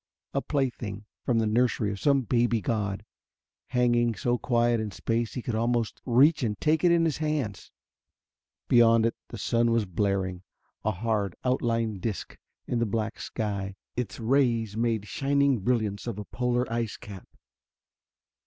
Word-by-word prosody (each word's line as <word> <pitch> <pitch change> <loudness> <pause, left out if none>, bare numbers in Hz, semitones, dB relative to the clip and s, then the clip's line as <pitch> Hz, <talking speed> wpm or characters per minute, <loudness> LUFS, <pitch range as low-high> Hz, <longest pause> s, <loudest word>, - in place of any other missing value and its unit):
A 140 - +1
plaything 120 -8 -2 0.2
from 120 - +1
the 115 - +2
nursery 110 -1 +1
of 100 - -5
some 140 +1 +3
baby 120 +1 +2
god, 105 0 -2 0.6
hanging 120 -2 +2
so 120 +2 0
quiet 120 -1 +2
in 110 -1 -2
space 115 +3 -2
he 125 - -4
could 120 - -3
almost 115 0 0
reach 145 +6 +5
and 105 -5 -1
take 155 +2 +2
it 175 - +5
in 170 -1 +4
his 160 - 0
hands. 150 -10 -2 1.0
Beyond 115 -1 +5
it 115 - 0
the - - -8
sun 120 0 +1
was 115 -2 +2
blaring, 95 -1 -1 0.4
a 110 - +1
hard 105 -1 -1
outlined 115 -5 0
disc 105 -2 -4 0.3
in 120 - -1
the 115 - +1
black 110 +1 -2
sky. 100 -3 -3 0.2
Its 120 -3 -4
rays 115 -3 +2
made 115 -2 0
shining 140 -3 +2
brilliance 110 -1 -1
of 115 -4 -3
a 105 - -5
polar 125 0 0
ice 115 -2 -2
cap. 100 -3 -10
115 Hz, 155 wpm, -27 LUFS, 105-125 Hz, 1.0 s, reach